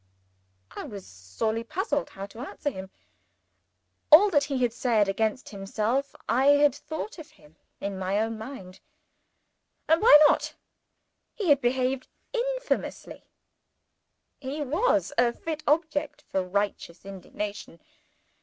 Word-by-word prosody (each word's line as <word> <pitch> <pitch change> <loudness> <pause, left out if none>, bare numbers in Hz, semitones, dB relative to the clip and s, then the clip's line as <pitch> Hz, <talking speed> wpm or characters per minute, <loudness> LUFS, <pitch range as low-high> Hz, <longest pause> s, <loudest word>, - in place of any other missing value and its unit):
I - - -7
was 200 -3 -9
sorely 95 - -3
puzzled 290 +1 -2
how 195 - -7
to 205 +3 -13
answer 290 +2 -4
him. 190 -4 -8 1.2
All 390 +7 +9
that 290 -4 +3
he 275 -3 -2
had 240 -2 +1
said 230 -4 +2
against 220 +5 -1
himself, 215 +7 -2
I 260 +3 +2
had 290 -2 +4
thought 315 +7 -7
of 320 +1 -10
him 150 +1 -22 0.2
in 200 -1 -4
my 190 +2 0
own 225 +1 -1
mind. 215 -5 -9 1.1
And 320 +1 +4
why 445 -8 +9
not? - - 0 0.8
He 410 -8 -2
had 285 -1 +5
behaved 255 +1 0 0.3
infamously - - -3 1.1
he 285 +2 -4
was 330 - +1
a 240 -1 +4
fit 315 +2 -5
object 300 -1 0
for 190 - -2
righteous 190 -2 -3
indignation. 195 -1 -7
250 Hz, 125 wpm, -27 LUFS, 200-295 Hz, 1.2 s, All